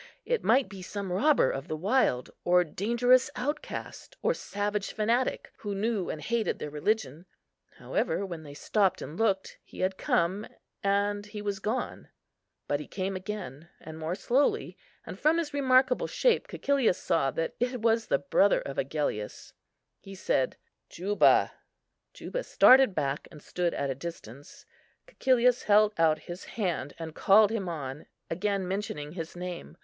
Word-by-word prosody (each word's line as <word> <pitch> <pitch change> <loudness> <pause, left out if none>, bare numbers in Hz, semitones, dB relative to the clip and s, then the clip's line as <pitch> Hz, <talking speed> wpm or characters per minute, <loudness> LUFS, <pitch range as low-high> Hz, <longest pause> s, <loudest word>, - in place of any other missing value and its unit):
It 485 -2 0
might 255 +4 +4
be 195 -2 -10
some 195 +1 -5
robber 265 - +3
of 135 +1 -5
the 155 - -3
wild, 175 - +1
or 180 0 +4
dangerous 235 - +2
outcast, 290 +4 -5
or 480 - +3
savage 205 - -3
fanatic, 230 +4 0
who 205 -1 -4
knew 205 -2 -1
and 155 - -4
hated 225 +8 -1
their 150 - -6
religion; 165 - -2 0.5
however, 200 - -1
while 175 -4 -6
they 145 -2 -11
stopped 195 +4 +1
and 155 - -8
looked, 195 -2 0
he - - -10
had 185 0 0
come, 185 +5 0 0.3
and 205 +1 0
he 210 0 -7
was 205 -1 -3
gone. 230 +5 -3 0.6
But 145 - 0
he 150 - -8
came 190 0 -3
again, 185 -6 -6 0.2
more 160 +2 -4
slowly; 260 +7 +1 0.3
and - - -8
from 310 +2 +3
his 315 -3 -2
remarkable 260 -2 +3
shape - - +2
Cæcilius 280 - +1
saw 160 -5 +1
that 165 +4 -2
it 245 +1 -1
was 225 -1 +2
the - - +3
brother 190 +8 +3
of 140 - -5
Agellius. 135 -7 -3 0.5
He 195 0 -11
said, 135 -8 0 0.3
"Juba;" 200 +4 +3 0.6
Juba - - -5
started 260 -6 +6
back, 140 -1 -2
and 150 - -13
stood 175 +3 -2
at 140 -1 -1
a 135 +1 -7
distance. 145 -5 -9 0.4
Cæcilius 250 - +2
held 210 0 +5
out 160 -2 +3
his 175 +1 -7
hand, 170 - -3
and 165 -1 -7
called 205 +5 +5
him 200 -5 -2
on, 145 -3 -6 0.2
again 195 +2 -1
mentioning 180 -7 -4
his 165 -1 -7
name. 180 -1 -7
195 Hz, 155 wpm, -28 LUFS, 160-225 Hz, 0.6 s, started